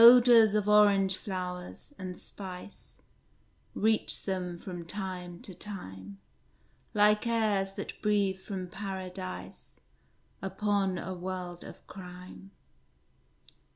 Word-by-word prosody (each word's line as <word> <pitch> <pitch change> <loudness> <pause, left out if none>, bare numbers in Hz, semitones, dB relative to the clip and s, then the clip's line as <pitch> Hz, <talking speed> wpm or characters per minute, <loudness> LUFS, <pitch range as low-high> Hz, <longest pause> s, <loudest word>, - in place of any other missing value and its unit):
Odors 235 -3 +9
of 210 -1 +1
orange 200 -2 +6
flowers, 180 +6 -5
and 185 -1 -5
spice. 190 0 -8 0.8
Reached 220 +1 +4
them 180 -3 -2
from 175 -1 -7
time 180 -1 -5
to 190 - -7
time, 100 - -8 0.8
Like 210 +2 +4
airs 210 -4 +1
that - - -7
breathe 200 -3 +2
from 190 -1 -5
Paradise 185 -1 -6 0.6
Upon 195 -1 0
a 185 - -4
world 180 -1 -5
of - - -11
crime. 180 0 -10
190 Hz, 100 wpm, -30 LUFS, 180-210 Hz, 0.8 s, Odors